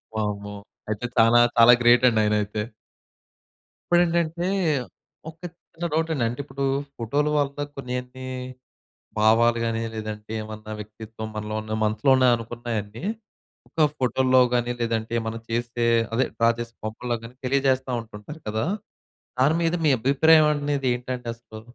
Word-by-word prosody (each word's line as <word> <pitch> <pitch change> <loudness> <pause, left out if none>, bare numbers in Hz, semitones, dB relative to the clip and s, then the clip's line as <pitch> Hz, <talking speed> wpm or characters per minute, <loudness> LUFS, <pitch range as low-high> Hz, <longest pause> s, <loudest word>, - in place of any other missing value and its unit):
వామ్మో! 105 -1 -3 0.3
అయితే 110 +3 -3
చానా 115 +1 +6 0.2
చాలా 115 +1 +9
గ్రేటండి 120 -1 +5
ఆయనయితే. 105 0 0 1.3
ఇప్పుడేంటంటే, 170 0 +2 0.8
ఒక 160 - -14 0.4
చిన్న 170 +1 -5
డౌటండి. 160 -5 0
అంటే 120 - -7
ఇప్పుడు 140 0 -5 0.3
ఫోటోలు 145 +6 0
వల్ల 145 0 -1
కొన్నేంటి, 125 0 -6 0.9
భావాలు 115 +2 +4
గాని, 115 0 -1
లేదంటే 110 0 -6
ఏమన్నా 110 0 -8
వ్యక్తిత్వం 110 +1 -8
మనలో 105 0 -4
ఉన్న 110 0 -7
మనసులోనే 130 +5 +3
అనుకున్నాయన్ని, 115 - -5 0.6
ఒక 155 -2 +2
ఫోటోల్లో 130 0 +3
గాని, 120 0 +1
లేదంటే 115 -1 -1
మనం 115 0 -4
చేసే, 120 0 -1 0.3
అదే 130 - +2
డ్రా 115 0 +4
చేసే 115 0 -6
బొమ్మలలో 120 +2 -3
గాని, 115 +2 -10
తెలియజేస్తా 130 -1 +1
ఉంటుంటారు 115 +8 -11
కదా! 110 +5 -1 0.7
దాని 150 +5 +4
మీద 165 +1 +1
మీ 145 - +5
అభిప్రాయం 155 +4 +5
అనేది 145 -2 -1
ఏంటండి 125 0 -5
అసలు? 110 -2 -12
120 Hz, 125 wpm, -24 LUFS, 110-135 Hz, 1.3 s, చాలా